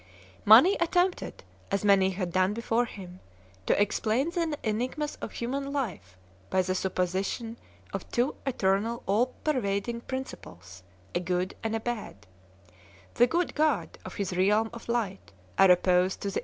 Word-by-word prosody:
Mani 250 - +8
attempted, 355 +2 0 0.3
as 200 +1 -1
many 195 -2 +5
had 185 -2 -3
done 185 +3 +2
before 230 +1 +1
him, 185 -5 -10 0.5
to - - +3
explain 220 +8 +1
the 335 -4 -1
enigmas 255 +8 -2
of - - -7
human 275 +4 -3
life 185 - -4 0.3
by 185 - +2
the 185 0 -1
supposition 190 +5 -2 0.4
of - - -5
two. 245 +4 +1
eternal 225 0 0
all 215 +6 +2 0.2
pervading 235 -4 -1
principles, 100 - -8 0.3
a - - +1
good 180 +1 -1
and 225 0 -1
a - - 0
bad; 220 - -5 0.9
the 245 - +5
good 345 +6 0
God 300 -6 0
and 185 - -8
his 195 -2 -3
realm 210 +4 +2
of 235 0 -10
light 200 - -2 0.3
are 195 - +7
opposed 180 +1 +3
to 200 - -2
the - - -1
215 Hz, 150 wpm, -28 LUFS, 185-245 Hz, 0.9 s, Mani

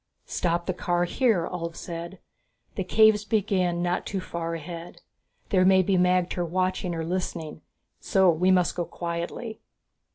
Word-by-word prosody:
"Stop 170 0 -1
the 185 - -1
car 175 -1 0
here," 195 -2 +1
Ulv 170 -2 -5
said, 170 +2 -7 0.6
"The 190 - -2
caves 215 +2 +4
begin 190 -5 0
not 180 0 0
too 195 - -2
far 170 -2 -4
ahead. 165 +1 -8 0.5
There 185 -3 +4
may 190 0 +5
be 195 +1 +1
magter 180 0 +2
watching 185 0 -1
or 165 -1 -3
listening, 170 -3 -4 0.4
so 190 -2 +4
we 175 +3 +1
must 180 -2 +3
go 175 - -1
quietly." 170 +8 -5
180 Hz, 150 wpm, -26 LUFS, 170-190 Hz, 0.6 s, may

